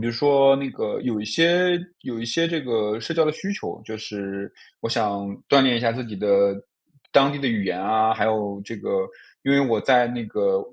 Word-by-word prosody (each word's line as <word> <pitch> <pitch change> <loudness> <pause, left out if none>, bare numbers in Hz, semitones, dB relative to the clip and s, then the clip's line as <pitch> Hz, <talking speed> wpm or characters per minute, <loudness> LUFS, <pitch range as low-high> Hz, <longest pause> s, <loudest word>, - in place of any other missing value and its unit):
比 - - -4
如 120 - -1
说 135 +1 +5
那 135 -1 -4
个 105 - -4
有 110 -4 -2
一 - - -5
些 175 +8 +3 0.2
有 120 -3 -6
一 115 - -5
些 165 +8 0
这 165 -2 -1
个 110 -3 -1
社 115 - -4
交 165 - +3
的 155 - +2
需 195 +5 -5
求， 205 - -7
就 110 -1 -7
是 100 -2 -7 0.3
我 - - -3
想 100 -4 -1 0.2
锻 140 - +6
炼 125 -2 +3
一 - - 0
下 115 -1 +1
自 125 +1 -5
己 110 -3 -8
的 100 0 +3 0.6
当 140 0 +5
地 145 - -5
的 140 - -2
语 110 -4 0
言 90 -1 -2
啊。 110 +3 +2
还 - - 0
有 105 -2 -1
这 - - -8
个 485 +2 -2 0.4
因 140 - +2
为 140 - +5
我 115 -6 +1
在 125 -1 +4
那 120 -1 -4
个 - - 0
120 Hz, 250 characters per minute, -23 LUFS, 105-140 Hz, 0.6 s, 锻